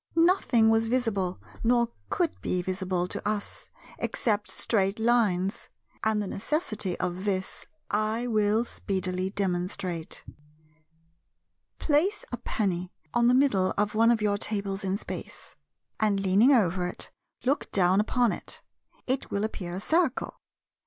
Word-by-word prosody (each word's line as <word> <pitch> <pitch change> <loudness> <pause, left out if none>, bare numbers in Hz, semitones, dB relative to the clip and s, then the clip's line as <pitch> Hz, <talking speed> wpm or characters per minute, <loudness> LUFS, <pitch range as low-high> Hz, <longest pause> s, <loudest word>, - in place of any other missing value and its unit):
Nothing 330 - +4
was 225 0 +3
visible, 220 -7 0 0.2
nor 235 0 +3 0.2
could 350 -5 -1
be 180 -1 -1
visible, 185 -1 -1
to - - -4
us, 210 -1 -4 0.3
except 210 -3 0
Straight 195 -2 +1
Lines; 215 -5 +1 0.3
and 220 -1 +2
the 210 - -1
necessity 215 - -1
of 180 +1 -2
this 190 -2 -2 0.2
I 215 +3 0
will 215 -1 +2
speedily 185 -4 -2
demonstrate. 180 -3 -2 1.5
Place 335 +8 +1
a 245 - -2
penny 185 -6 -2 0.2
on 235 0 +4
the 250 - +5
middle 205 -9 +3
of 210 0 +1
one 225 +2 +4
of 230 -2 +2
your 205 -1 +1
tables 200 -2 -1
in 190 0 0
Space; - - -8 0.4
and 210 -2 +2
leaning 195 +7 +4
over 185 -8 +3
it, 180 - -5 0.3
look 275 +4 0
down 185 0 +4
upon 235 +2 +2
it. - - -6 0.4
It 260 +1 0
will 200 +1 -1
appear 180 -5 -4
a - - -3
circle. 315 - 0
210 Hz, 135 wpm, -28 LUFS, 190-235 Hz, 1.5 s, the